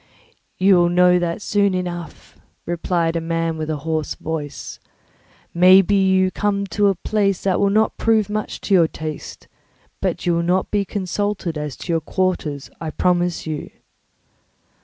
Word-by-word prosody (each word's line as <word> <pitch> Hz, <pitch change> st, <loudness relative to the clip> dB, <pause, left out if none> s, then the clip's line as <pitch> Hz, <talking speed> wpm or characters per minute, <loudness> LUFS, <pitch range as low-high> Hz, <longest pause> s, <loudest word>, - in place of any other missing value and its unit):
"You 190 Hz, 0 st, +5 dB
will 175 Hz, 0 st, +4 dB
know 180 Hz, 0 st, +4 dB
that 175 Hz, +3 st, -3 dB
soon 200 Hz, -2 st, +1 dB
enough," 175 Hz, -2 st, -6 dB, 0.3 s
replied 170 Hz, -1 st, -1 dB
a 165 Hz, -, 0 dB
man 165 Hz, 0 st, -1 dB
with 155 Hz, 0 st, -4 dB
a 155 Hz, -, 0 dB
hoarse 160 Hz, -1 st, -2 dB
voice. 155 Hz, -2 st, -6 dB, 0.7 s
"Maybe 185 Hz, +3 st, +6 dB
you 190 Hz, -1 st, +3 dB
are -, -, -15 dB
come 200 Hz, 0 st, -1 dB
to 205 Hz, +2 st, +3 dB
a 195 Hz, -, +2 dB
place 195 Hz, 0 st, 0 dB
that 190 Hz, -2 st, +1 dB
will 200 Hz, -, +3 dB
not 215 Hz, +2 st, +1 dB
prove 220 Hz, -2 st, +2 dB
much 215 Hz, 0 st, -4 dB
to 200 Hz, -, -1 dB
your 170 Hz, -4 st, +5 dB
taste, 155 Hz, -1 st, -7 dB, 0.5 s
but -, -, -2 dB
you 175 Hz, -, +2 dB
will 170 Hz, -, +1 dB
not 180 Hz, +2 st, 0 dB
be 205 Hz, -1 st, +1 dB
consulted 195 Hz, -2 st, -3 dB
as 150 Hz, -2 st, -5 dB
to 170 Hz, -, -4 dB
your 165 Hz, -, +1 dB
quarters, 155 Hz, -5 st, -2 dB
I 160 Hz, -, -3 dB
promise 175 Hz, +1 st, 0 dB
you." 155 Hz, -2 st, -5 dB
180 Hz, 165 wpm, -20 LUFS, 165-195 Hz, 0.7 s, Maybe